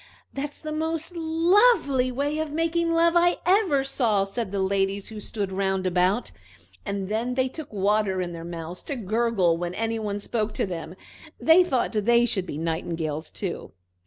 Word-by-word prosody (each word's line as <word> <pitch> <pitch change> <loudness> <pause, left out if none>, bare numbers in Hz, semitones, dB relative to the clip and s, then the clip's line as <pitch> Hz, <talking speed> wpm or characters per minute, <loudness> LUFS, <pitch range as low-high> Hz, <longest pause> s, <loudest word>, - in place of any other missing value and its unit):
"That's 285 +1 -5
the 310 - -5
most 320 +2 -2
lovely 325 - +3
way 285 +4 -1
of 315 -1 -2
making 330 +2 0
love 335 0 +4
I 350 +1 +4
ever 365 -7 +3
saw!" 235 -7 +1
said 195 +1 -4
the 200 - -2
ladies 195 +1 0
who 220 -1 -7
stood 205 -2 -4
round 190 0 -1
about, 185 +5 +1 0.5
and 200 -2 -3
then 230 +4 -1
they 260 0 +2
took 305 +3 -8
water 200 -1 +1
in 175 -1 -3
their 165 0 -7
mouths 170 +1 -6
to 285 - -1
gurgle 215 -6 +1
when 175 +1 -4
any 225 +1 -1
one 205 -2 -2
spoke 215 +1 -1
to - - 0
them. 175 -2 -6 0.4
They 325 +3 +6
thought 265 -8 0
they 235 +2 +3
should 190 -5 -2
be 145 - -5
nightingales 160 -1 -3
too. 190 -4 -5
220 Hz, 175 wpm, -25 LUFS, 190-295 Hz, 0.5 s, They